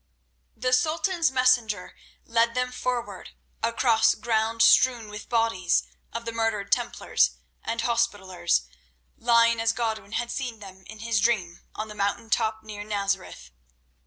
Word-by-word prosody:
The 255 Hz, 0 st, 0 dB
Sultan's 325 Hz, +5 st, +2 dB
messenger 250 Hz, -7 st, +1 dB, 0.3 s
led 230 Hz, 0 st, +1 dB
them 250 Hz, 0 st, 0 dB
forward, 250 Hz, -1 st, -4 dB, 0.3 s
across 230 Hz, -1 st, +3 dB
ground 225 Hz, 0 st, +1 dB
strewn 235 Hz, -1 st, +4 dB
with 210 Hz, 0 st, -8 dB
the -, -, -32 dB
bodies 225 Hz, -7 st, +1 dB, 0.3 s
of 230 Hz, 0 st, -6 dB
the 230 Hz, -, -3 dB
murdered 225 Hz, -3 st, -1 dB
Templars -, -, +1 dB, 0.3 s
and 230 Hz, -, -2 dB
Hospitallers, 205 Hz, -, 0 dB, 0.5 s
lying 230 Hz, -1 st, +3 dB
as 225 Hz, 0 st, +2 dB
Godwin 220 Hz, -3 st, -3 dB
had 240 Hz, +1 st, -2 dB
seen 250 Hz, -4 st, -4 dB
them 190 Hz, -2 st, -13 dB
in 220 Hz, 0 st, -11 dB
his 230 Hz, -1 st, +1 dB
dream 195 Hz, -6 st, 0 dB, 0.2 s
on 215 Hz, -, -4 dB
the 210 Hz, -, -9 dB
mountain 210 Hz, +2 st, -2 dB
top 220 Hz, 0 st, 0 dB
near 210 Hz, -1 st, -7 dB
Nazareth. 200 Hz, -, -3 dB
225 Hz, 140 wpm, -26 LUFS, 205-235 Hz, 0.5 s, strewn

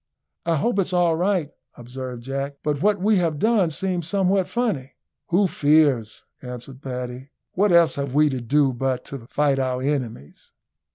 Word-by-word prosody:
"I 165 Hz, -, +3 dB
hope 205 Hz, +8 st, 0 dB
it's 185 Hz, -1 st, 0 dB
all 175 Hz, -2 st, +3 dB
right," 175 Hz, -3 st, 0 dB, 0.3 s
observed 125 Hz, 0 st, -7 dB
Jack, 135 Hz, +2 st, -4 dB
"but 150 Hz, -2 st, -1 dB
what 205 Hz, +2 st, +3 dB
we 205 Hz, +2 st, +2 dB
have 165 Hz, -4 st, 0 dB
done 210 Hz, -2 st, +2 dB
seems 175 Hz, 0 st, -2 dB
somewhat 190 Hz, -1 st, +1 dB
funny." 210 Hz, -, -2 dB, 0.3 s
"Who 190 Hz, +4 st, +3 dB
fears?" 145 Hz, -, +2 dB, 0.2 s
answered 125 Hz, +1 st, -9 dB
Paddy. 125 Hz, 0 st, -6 dB, 0.2 s
"What 200 Hz, +1 st, +2 dB
else 170 Hz, -3 st, +5 dB
have 140 Hz, -1 st, -3 dB
we 150 Hz, +1 st, +5 dB
to 130 Hz, -3 st, -3 dB
do 135 Hz, +2 st, +2 dB
but 130 Hz, 0 st, -2 dB
to 130 Hz, -4 st, -8 dB
fight 145 Hz, -2 st, +1 dB
our 130 Hz, -1 st, -1 dB
enemies?" 130 Hz, -, -4 dB
145 Hz, 165 wpm, -23 LUFS, 130-180 Hz, 0.3 s, else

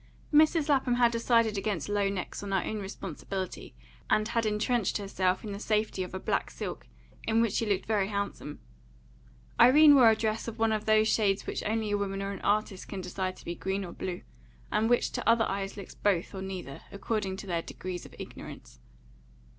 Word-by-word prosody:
Mrs. 310 Hz, +1 st, +5 dB
Lapham 270 Hz, -4 st, +2 dB
had 240 Hz, -1 st, +4 dB
decided 230 Hz, -2 st, +2 dB
against 195 Hz, -6 st, -2 dB
low 205 Hz, -1 st, +1 dB
necks 195 Hz, -2 st, -4 dB
on 200 Hz, -1 st, -5 dB
her 190 Hz, -2 st, +1 dB
own 215 Hz, -, -3 dB
responsibility, 190 Hz, -, -6 dB, 0.3 s
and 215 Hz, +1 st, +2 dB
had 230 Hz, -2 st, +1 dB
entrenched 215 Hz, 0 st, +1 dB
herself 190 Hz, -2 st, -1 dB
in 215 Hz, -, -5 dB
the 200 Hz, -, -5 dB
safety 215 Hz, -2 st, 0 dB
of 185 Hz, 0 st, -5 dB
a -, -, -3 dB
black -, -, -1 dB
silk, -, -, -6 dB, 0.4 s
in 225 Hz, 0 st, +3 dB
which 230 Hz, -3 st, +2 dB
she 225 Hz, -, 0 dB
looked 200 Hz, -2 st, 0 dB
very 210 Hz, -3 st, +1 dB
handsome. 200 Hz, -7 st, -4 dB, 1.0 s
Irene 295 Hz, +4 st, +8 dB
wore 255 Hz, -5 st, +8 dB
a 220 Hz, -, +4 dB
dress 220 Hz, +1 st, -2 dB
of 230 Hz, -1 st, -5 dB
one 225 Hz, -1 st, +2 dB
of 215 Hz, -1 st, -1 dB
those 215 Hz, 0 st, +4 dB
shades 200 Hz, -3 st, +2 dB
which -, -, -3 dB
only 220 Hz, -1 st, -1 dB
a 205 Hz, -, +1 dB
woman 195 Hz, -1 st, -2 dB
or 195 Hz, -, -3 dB
an 195 Hz, -, -7 dB
artist 205 Hz, -2 st, 0 dB
can 195 Hz, -2 st, -5 dB
decide 185 Hz, +1 st, -3 dB
to -, -, -15 dB
be 170 Hz, -, -3 dB
green 190 Hz, +2 st, -3 dB
or 175 Hz, -, -8 dB
blue, 180 Hz, +1 st, -5 dB, 0.5 s
and 215 Hz, +2 st, +2 dB
which 245 Hz, -, +2 dB
to -, -, -1 dB
other 230 Hz, -1 st, +4 dB
eyes 195 Hz, +1 st, -3 dB
looks 200 Hz, -, -8 dB
both 190 Hz, -4 st, 0 dB
or 190 Hz, -, -5 dB
neither, 185 Hz, -8 st, -6 dB
according 200 Hz, -1 st, -2 dB
to 200 Hz, -, -8 dB
their 170 Hz, -3 st, -1 dB
degrees 180 Hz, +1 st, -6 dB
of -, -, -13 dB
ignorance. -, -, -10 dB
205 Hz, 200 wpm, -29 LUFS, 190-225 Hz, 1.0 s, Irene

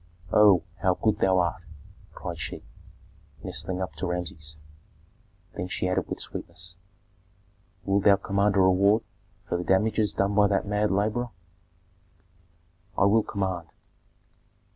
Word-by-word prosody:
"Oh, 100 Hz, -5 st, +6 dB, 0.2 s
how 90 Hz, -1 st, +2 dB
good 105 Hz, +1 st, 0 dB
thou 95 Hz, -1 st, +3 dB
art!" 85 Hz, -2 st, 0 dB, 0.5 s
cried 85 Hz, -2 st, -6 dB
she, 70 Hz, -, -6 dB, 0.8 s
nestling 95 Hz, 0 st, -2 dB
up 95 Hz, -, -6 dB
to 95 Hz, -, -2 dB
Rameses; 80 Hz, -4 st, -5 dB, 1.0 s
then 90 Hz, -, -3 dB
she 90 Hz, -, -2 dB
added 90 Hz, 0 st, 0 dB
with -, -, -4 dB
sweetness, 85 Hz, +1 st, -6 dB, 1.1 s
"Wilt 100 Hz, 0 st, +1 dB
thou 100 Hz, -1 st, +7 dB
command 100 Hz, +1 st, 0 dB
a 100 Hz, -, +5 dB
reward 100 Hz, +4 st, +4 dB, 0.4 s
for 90 Hz, -, -1 dB
the -, -, -3 dB
damages 105 Hz, +3 st, +2 dB
done 100 Hz, +1 st, 0 dB
by 105 Hz, 0 st, +5 dB
that 100 Hz, 0 st, 0 dB
mad 105 Hz, +1 st, 0 dB
laborer?" 105 Hz, +5 st, 0 dB, 1.7 s
"I -, -, +4 dB
will 110 Hz, +3 st, +4 dB
command." 95 Hz, -5 st, -3 dB
95 Hz, 130 wpm, -26 LUFS, 90-105 Hz, 1.7 s, thou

